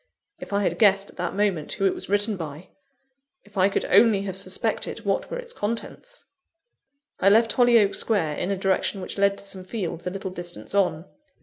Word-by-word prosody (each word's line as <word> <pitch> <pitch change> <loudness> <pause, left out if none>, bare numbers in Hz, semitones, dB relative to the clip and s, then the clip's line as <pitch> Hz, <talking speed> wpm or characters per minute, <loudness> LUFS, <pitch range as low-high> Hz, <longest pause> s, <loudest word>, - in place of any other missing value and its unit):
If - - -9
I 200 0 +1
had - - -1
guessed 200 -2 +4
at - - -23
that 180 +1 -3
moment 195 -7 0
who 195 - -1
it 190 - +3
was - - -7
written 205 +1 +4
by! 160 -1 -8 0.7
If 210 0 -22
I 190 0 +4
could - - -1
only 205 0 +5
have 190 -2 -5
suspected 195 +4 -3
what 195 -1 -1
were - - -4
its 485 -1 -8
contents! 235 - -5 0.9
I 195 - +5
left 225 +2 +4
Hollyoake 235 -5 +4
Square 165 -9 0
in 180 - -2
a 200 - -1
direction 195 +1 0
which 185 - -5
led 200 0 +3
to - - -12
some 195 -2 -8
fields 180 -4 -5
a - - +1
little 190 0 -6
distance 175 0 -6
on. 180 -5 +1
195 Hz, 200 wpm, -24 LUFS, 185-210 Hz, 0.9 s, only